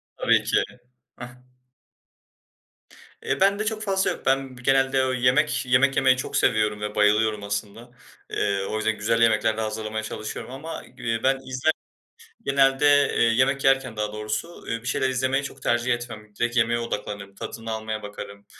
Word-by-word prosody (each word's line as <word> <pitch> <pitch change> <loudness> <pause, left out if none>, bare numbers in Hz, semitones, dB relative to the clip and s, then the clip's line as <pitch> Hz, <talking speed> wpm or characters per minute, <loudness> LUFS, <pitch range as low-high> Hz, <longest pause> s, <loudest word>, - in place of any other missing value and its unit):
Tabii - - +3
ki. - - +2 0.5
Ah. 120 0 -8 1.9
Eee, - - -1
bende 200 +2 +3
çok 215 0 -2
fazla 190 -2 +1
yok. - - -8
Ben 135 -1 +1
genelde, 135 +1 +2
ööö, 130 0 0
yemek, 130 +3 +2
yemek 130 +2 +3
yemeyi 130 -1 +4
çok - - -3
seviyorum 105 -1 +2
ve 105 0 -4
bayılıyorum 105 0 +2
aslında. 100 +4 -5 0.4
Eee, 100 -1 0
o 110 - -2
yüzden 110 0 0
güzel 115 +2 +1
yemekler 110 -1 +3
de - - -1
hazırlamaya 110 0 -3
çalışıyorum 110 +3 -6
ama 155 +5 -7
gü 115 -3 -3
ben 135 0 +3
izler 130 +4 +1 0.7
genelde, 135 +1 +3 0.3
eee, - - +3
yemek 130 +4 +2
yerken 135 -4 +2
daha 105 0 -2
doğrusu, 105 +7 -3
ııı, - - -16 0.2
bir - - -12
şeyler 130 +3 +1
izlemeyi 130 +2 0
çok 135 -1 -9
tercih 120 +1 +1
etmem. 110 -3 -9
Direkt 120 +1 -1
yemeğe 120 0 +3
odaklanırım, 105 -3 -5
tadını 115 +3 -7
almaya 110 0 -4
bakarım. 100 0 -9
120 Hz, 160 wpm, -24 LUFS, 110-135 Hz, 1.9 s, yemeyi